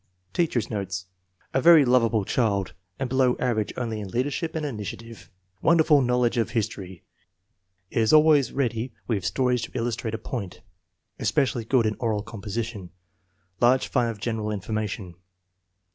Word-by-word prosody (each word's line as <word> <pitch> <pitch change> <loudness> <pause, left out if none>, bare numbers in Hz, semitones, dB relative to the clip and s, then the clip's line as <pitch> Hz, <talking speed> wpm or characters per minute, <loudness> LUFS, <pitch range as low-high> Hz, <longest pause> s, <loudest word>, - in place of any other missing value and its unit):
Teacher's 130 - 0
notes. 95 -4 -4 0.5
A 135 - +2
very 165 -2 +7
lovable 115 -4 +3
child, 100 -6 0 0.2
and 135 - -2
below 130 0 +2
average 115 -4 0
only 115 -3 -3
in 105 - -5
leadership 145 - -2
and 155 -1 -2
initiative. 110 - -7 0.2
" 95 +1 -44
Wonder 165 -1 +5
ful 150 -3 +5
knowledge 125 -1 +1
of 115 0 +1
history. 100 -6 -4 0.9
Is 110 -2 +2
always 155 -3 +5
ready 120 -2 -2
with 105 -6 -1
sto 130 +4 0
ries 125 -1 +1
to - - -6
illustrate 115 -2 -2
a - - -3
point. 110 -4 -6 0.6
Especially 125 -5 0
good 125 -1 +2
in 110 0 0
oral 110 -4 -1
composition. 110 -2 -5 0.7
Large 125 +2 +3
fund 120 - +1
of 110 -2 -6
general 110 -1 -2
information." 105 -2 -4
115 Hz, 150 wpm, -25 LUFS, 105-130 Hz, 0.9 s, very